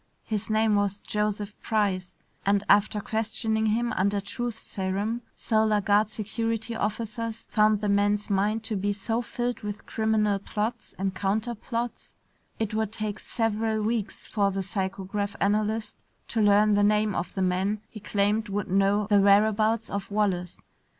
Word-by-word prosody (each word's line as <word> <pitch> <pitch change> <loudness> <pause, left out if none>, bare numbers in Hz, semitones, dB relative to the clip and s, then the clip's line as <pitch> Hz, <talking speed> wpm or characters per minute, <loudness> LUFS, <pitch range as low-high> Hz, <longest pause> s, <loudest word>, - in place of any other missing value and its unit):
His 215 -1 -3
name 220 0 +3
was 205 -1 +1
Joseph 210 0 -2
Price, 200 -5 0 0.3
and 200 0 +2
after 205 +1 +4
questioning 220 0 0
him 235 +2 +1
under 200 +2 +1
truth 220 +4 -4
serum, 200 +4 -2
Solar 215 -2 +2
Guard 205 +1 +3
security 225 +1 -2
officers 225 +1 -3
found 215 -1 +4
the 210 - 0
man's 205 +1 +2
mind 210 +2 +1
to 220 - -1
be 205 +1 0
so 225 +4 -1
filled 245 0 -3
with 210 -1 -6
criminal 215 -2 +1
plots 215 +3 -4
and 195 0 -1
counter 205 +5 -1
plots, 235 +1 -5 0.4
it 220 -2 -2
would 220 -1 0
take 215 -1 -3
several 220 -1 -1
weeks 220 -1 -2
for 200 -2 +1
the 195 0 -2
psychograph 195 +1 -3
analyst 215 +1 0 0.3
to 225 - 0
learn 205 +1 +5
the 205 - +3
name 210 0 +3
of - - -3
the 190 - 0
man 190 +3 0
he 220 - -10
claimed 205 +1 0
would 200 0 -2
know 200 +2 +3
the 205 -1 +4
whereabouts 215 +2 +4
of 200 -1 -3
Wallace. 195 -4 0
210 Hz, 155 wpm, -27 LUFS, 200-220 Hz, 0.4 s, learn